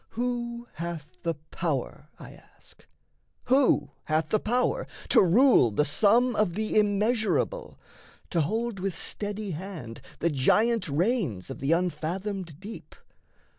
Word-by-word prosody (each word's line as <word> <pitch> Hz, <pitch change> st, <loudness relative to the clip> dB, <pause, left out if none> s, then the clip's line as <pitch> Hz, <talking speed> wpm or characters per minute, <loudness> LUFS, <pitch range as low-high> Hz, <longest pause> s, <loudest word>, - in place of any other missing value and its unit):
Who 240 Hz, 0 st, -3 dB
hath 165 Hz, -3 st, -7 dB
the 165 Hz, -1 st, -1 dB, 0.2 s
power 150 Hz, -2 st, -3 dB
(I -, -, -11 dB
ask), -, -, -18 dB, 0.6 s
who 265 Hz, +1 st, +3 dB
hath 155 Hz, +1 st, 0 dB
the 215 Hz, -, +2 dB
power 250 Hz, -, 0 dB, 0.2 s
To -, -, +6 dB
rule 205 Hz, -, +5 dB
the 110 Hz, +8 st, +1 dB
sum 230 Hz, -, +3 dB
of 195 Hz, -5 st, +1 dB
the 215 Hz, +1 st, -2 dB
immeasurable, 215 Hz, -, 0 dB, 0.5 s
To 170 Hz, -, +2 dB
hold 220 Hz, +6 st, -2 dB
with 190 Hz, -2 st, -3 dB
steady 205 Hz, -1 st, -3 dB
hand 160 Hz, -9 st, -7 dB, 0.2 s
the 170 Hz, -, 0 dB
giant 210 Hz, -, +2 dB
reins 155 Hz, -, 0 dB
Of -, -, -7 dB
the 140 Hz, +4 st, +2 dB
unfathomed 175 Hz, 0 st, -3 dB
deep? 210 Hz, +4 st, -10 dB
195 Hz, 130 wpm, -27 LUFS, 160-230 Hz, 0.6 s, To